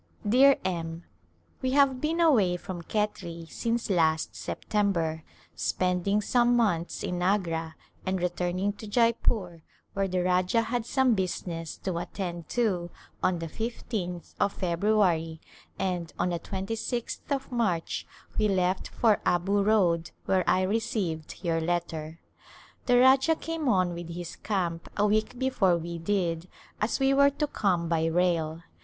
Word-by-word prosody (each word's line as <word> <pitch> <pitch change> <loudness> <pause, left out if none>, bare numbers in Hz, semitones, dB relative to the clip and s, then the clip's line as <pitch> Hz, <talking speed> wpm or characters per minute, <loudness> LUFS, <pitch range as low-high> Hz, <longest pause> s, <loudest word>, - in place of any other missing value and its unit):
Dear 265 +5 +6
M: 165 -2 -3 0.6
We 260 -1 0
have 270 -2 +4
been 320 +2 0
away 220 - +4
from 175 -1 -7
Khetri 170 -4 -3
since 235 0 -1
last 160 -5 +1
September, 170 -7 -1 0.3
spending 185 +3 0
some 240 +2 +3
months 180 -8 0
in 180 0 -2
Agra, 165 -4 0 0.3
and 190 0 -1
re 180 0 +1
turning 180 +3 -1
to 215 - -8
Jeypore, 215 -6 +1 0.3
where 195 0 0
the 180 -1 0
Rajah 185 +5 +2
had 235 0 -2
some 260 -3 +3
busi 185 -2 -2
ness 165 -3 -5
to 180 -3 -3
attend 175 -3 -5
to 190 -8 0 0.3
on 185 -1 +2
the 165 - -4
15th 200 -2 -4
of 200 - +2
February 175 -3 +1 0.4
and 180 -3 -2
on 180 - +1
the 170 -1 -2
26th 225 +6 -4
of 275 -2 -2
March 210 -9 -1 0.3
we 215 - +4
left 185 -1 +1
for 220 -3 +2
Abu 195 +4 +2
Road 180 -6 +2 0.2
where 190 -1 +2
I 185 - +3
re 205 +4 +1
ceived 190 - -4
your 165 -2 +1
letter. 165 -1 -3 0.7
The 245 -1 +5
Rajah 265 +5 +5
came 325 -3 -3
on 185 -4 +2
with 170 0 -7
his 175 0 -6
camp 175 -5 -2
a 205 - +3
week 215 +3 +1
before 230 -9 +2
we 170 0 -5
did 170 -2 -1 0.3
as 210 +6 0
we 270 0 +3
were 280 +1 +6
to 285 +2 -1
come 185 - 0
by 165 -1 +1
rail. 165 -1 0
185 Hz, 150 wpm, -28 LUFS, 170-225 Hz, 0.7 s, Dear